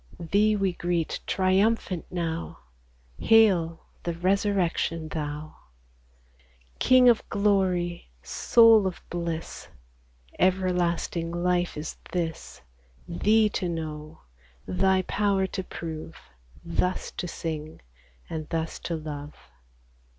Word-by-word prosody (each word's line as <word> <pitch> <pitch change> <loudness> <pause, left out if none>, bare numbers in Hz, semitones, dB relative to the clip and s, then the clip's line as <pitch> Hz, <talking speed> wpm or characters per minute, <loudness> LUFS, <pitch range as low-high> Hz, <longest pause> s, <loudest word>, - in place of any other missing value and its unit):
Thee 205 +5 +2
we 195 -3 0
greet 175 -2 -1
triumphant 190 -1 +1
now, 170 -2 -3 0.6
Hail, 185 -8 +4 0.2
the 170 -1 -3
Resurrection 180 -3 0
Thou! 150 0 -5 1.2
King 255 0 +6
of 235 -2 +5
glory, 185 - +1
Soul 225 -4 +5
of 185 - -5
bliss! 170 -2 -4 0.7
Everlasting 180 -2 +1
life 175 0 0
is 150 +1 -5
this, 165 -2 -4 0.4
Thee 215 +1 +3
to 185 -3 -2
know, 155 -2 -6 0.4
Thy 185 - +2
power 200 0 +1
to 190 0 -4
prove, 165 -2 -7 0.5
Thus 180 +2 -1
to 180 - -5
sing, 155 -2 -5 0.5
and 155 -2 -5
thus 165 -1 -3
to 170 - -3
love 150 -2 -7
175 Hz, 100 wpm, -26 LUFS, 165-195 Hz, 1.2 s, King